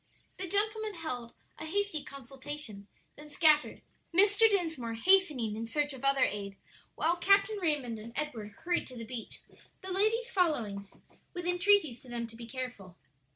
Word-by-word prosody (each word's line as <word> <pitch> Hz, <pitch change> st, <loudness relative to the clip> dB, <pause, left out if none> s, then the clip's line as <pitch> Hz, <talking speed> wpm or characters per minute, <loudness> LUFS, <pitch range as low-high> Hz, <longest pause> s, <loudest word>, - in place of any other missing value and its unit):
The 375 Hz, -, -3 dB
gentlemen 425 Hz, +2 st, 0 dB
held 250 Hz, -8 st, -5 dB, 0.2 s
a -, -, -5 dB
hasty 400 Hz, -3 st, -1 dB
consultation, 270 Hz, -5 st, -7 dB, 0.3 s
then 300 Hz, 0 st, -12 dB
scattered, 300 Hz, 0 st, +3 dB, 0.3 s
Mr. 405 Hz, +5 st, +5 dB
Dinsmore 320 Hz, -, -1 dB
hastening 290 Hz, -, +3 dB
in 225 Hz, +1 st, -4 dB
search 290 Hz, +3 st, 0 dB
of 265 Hz, -, -10 dB
other 275 Hz, -1 st, +4 dB
aid, 200 Hz, -1 st, -2 dB, 0.4 s
while 340 Hz, +2 st, +1 dB
Captain 400 Hz, +3 st, +3 dB
Raymond 280 Hz, -9 st, 0 dB
and 225 Hz, +2 st, -9 dB
Edward 235 Hz, -9 st, -4 dB
hurried 350 Hz, 0 st, 0 dB
to 255 Hz, -, -10 dB
the 230 Hz, -, -6 dB
beach, 230 Hz, -1 st, -7 dB, 0.4 s
the 380 Hz, -, -5 dB
ladies 440 Hz, +5 st, +1 dB
following 230 Hz, -, 0 dB, 0.5 s
with 355 Hz, -1 st, -4 dB
entreaties 355 Hz, -, +3 dB
to 255 Hz, -, -14 dB
them 235 Hz, -1 st, -3 dB
to 230 Hz, 0 st, -11 dB
be 230 Hz, 0 st, -9 dB
careful. 230 Hz, -8 st, -6 dB
295 Hz, 155 wpm, -31 LUFS, 235-370 Hz, 0.5 s, Mr